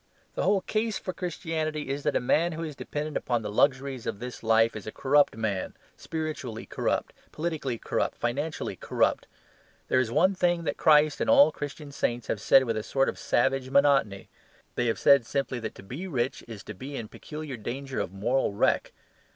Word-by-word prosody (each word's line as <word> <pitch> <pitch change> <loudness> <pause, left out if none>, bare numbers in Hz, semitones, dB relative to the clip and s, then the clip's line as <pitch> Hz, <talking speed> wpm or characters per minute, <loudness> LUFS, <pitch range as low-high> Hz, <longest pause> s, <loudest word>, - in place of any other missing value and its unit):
The - - -2
whole 195 +1 +3
case 220 +1 -1
for 185 - -5
Christianity 160 -4 -3
is 140 +1 -2
that - - 0
a - - +4
man 165 +7 +2
who 165 +1 -4
is 155 -3 -5
dependent 150 +2 -5
upon 120 -2 -1
the 105 - -4
luxuries 135 +1 +1
of - - -2
this 125 +3 -7
life 115 0 +3
is 110 - -7
a - - -3
corrupt 140 -1 +3
man, 105 -4 -2 0.2
spiritually 155 -8 -5
corrupt, - - -1 0.2
politically 155 -6 -3
corrupt, - - -2
financially 140 +7 -2
corrupt. - - 0 0.6
There 130 - +4
is 125 -3 +1
one 170 +10 +3
thing 175 -2 +1
that - - -1
Christ 150 -1 +4
and - - 0
all 280 0 +8
the - - -24
Christian 145 0 -6
saints 120 -4 -1
have 105 - -1
said 135 - +6
with 115 -3 -1
a - - -1
sort 135 +5 +1
of - - -6
savage 130 +2 +1
monotony. 135 -8 +3 0.5
They 120 - 0
have 115 - 0
said 140 -3 +6
simply 135 +1 -2
that 110 -2 -5
to - - -12
be 135 - -6
rich 130 -6 -2
is 110 -4 -9
to 105 - -7
be 135 +8 -8
in 115 -4 -5
peculiar 150 +3 -7
danger 130 +4 -5
of 90 - -2
moral 105 +5 0
wreck. - - +1
135 Hz, 200 wpm, -27 LUFS, 115-155 Hz, 0.6 s, all